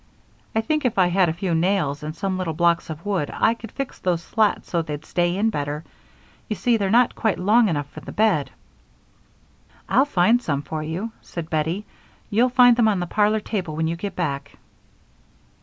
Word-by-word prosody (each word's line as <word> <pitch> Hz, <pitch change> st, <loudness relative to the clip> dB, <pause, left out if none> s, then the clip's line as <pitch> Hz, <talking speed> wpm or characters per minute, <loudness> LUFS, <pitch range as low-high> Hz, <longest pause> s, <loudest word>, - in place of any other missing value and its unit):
I 220 Hz, -, +3 dB
think 305 Hz, +6 st, -1 dB
if 250 Hz, -5 st, 0 dB
I 180 Hz, -2 st, +4 dB
had 180 Hz, -1 st, +3 dB
a -, -, -1 dB
few 175 Hz, 0 st, -2 dB
nails 165 Hz, -4 st, +1 dB
and 155 Hz, +1 st, -6 dB
some 195 Hz, 0 st, -2 dB
little 165 Hz, -4 st, -2 dB
blocks 170 Hz, 0 st, +2 dB
of 160 Hz, +4 st, -7 dB
wood 190 Hz, -8 st, -1 dB
I 225 Hz, -, +2 dB
could 225 Hz, -2 st, -10 dB
fix 275 Hz, -2 st, -5 dB
those 175 Hz, -2 st, -1 dB
slats 215 Hz, +2 st, +1 dB
so 170 Hz, -, 0 dB
they'd 150 Hz, -1 st, -6 dB
stay 175 Hz, 0 st, 0 dB
in 220 Hz, +2 st, +2 dB
better; 145 Hz, -2 st, -3 dB, 0.7 s
you 215 Hz, -, -1 dB
see 240 Hz, +3 st, +2 dB
they're 200 Hz, -3 st, -1 dB
not 240 Hz, +3 st, +4 dB
quite 220 Hz, -6 st, 0 dB
long 215 Hz, +4 st, +4 dB
enough 145 Hz, -4 st, -2 dB
for -, -, -9 dB
the -, -, -9 dB
bed." 205 Hz, -10 st, +2 dB, 1.4 s
"I'll 265 Hz, +3 st, +4 dB
find 225 Hz, 0 st, +3 dB
some 145 Hz, -, -2 dB
for 155 Hz, 0 st, -4 dB
you," 170 Hz, +9 st, -4 dB
said 165 Hz, -2 st, -7 dB
Bettie. 165 Hz, +6 st, -1 dB, 0.5 s
"You'll 235 Hz, +5 st, +3 dB
find 245 Hz, -1 st, +6 dB
them 235 Hz, -2 st, +4 dB
on 205 Hz, -4 st, +2 dB
the 175 Hz, -, -1 dB
parlor 210 Hz, +4 st, +1 dB
table 185 Hz, -8 st, -3 dB
when 160 Hz, +1 st, 0 dB
you 165 Hz, +1 st, -1 dB
get 195 Hz, +4 st, -5 dB
back." 140 Hz, -5 st, -3 dB
185 Hz, 200 wpm, -23 LUFS, 160-220 Hz, 1.4 s, find